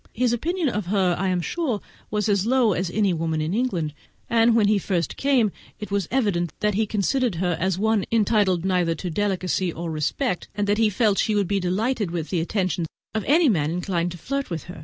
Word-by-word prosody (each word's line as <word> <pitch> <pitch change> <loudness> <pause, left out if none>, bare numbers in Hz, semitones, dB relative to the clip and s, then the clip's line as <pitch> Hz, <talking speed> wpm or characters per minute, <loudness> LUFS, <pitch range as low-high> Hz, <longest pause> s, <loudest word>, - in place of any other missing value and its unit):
His 245 0 +1
opinion 335 +7 -1
of 210 -7 -2
her, 185 -2 +2
I 190 - -1
am 180 -1 +1
sure, 255 - -2 0.3
was 210 +1 -1
as 200 0 +1
low 245 -4 +3
as 180 0 -1
of - - -9
any 205 -4 +2
woman 160 -1 -1
in 155 +3 -1
England; 190 - -1 0.4
and 230 0 +4
when 215 -3 +4
he 210 -1 +3
first 175 -5 -1
came 260 -7 +2 0.3
it 210 - -7
was 200 -4 0
evident 200 - 0
that 210 0 +1
he 215 +2 +1
considered 220 +2 0
her 175 0 0
as 185 0 0
one 215 -1 +1
entitled 205 -5 +2
neither 180 -3 +1
to 175 +2 -5
delicacy 185 -1 0
nor 165 0 -5
respect, 170 - -1
and 205 -1 0
that 205 +1 +1
he 225 -1 +4
felt 210 -1 +2
she 215 - +1
would 200 -3 +1
be 200 +1 +1
delighted 205 +4 0
with 165 -2 -4
the 180 - +1
attentions 180 -2 -1 0.3
of 220 -2 -1
any 320 +3 +5
man 155 - +2
inclined 175 0 -1
to - - -9
flirt 275 - -3
with 165 -3 -4
her. 180 -2 -10
200 Hz, 220 wpm, -24 LUFS, 175-225 Hz, 0.4 s, any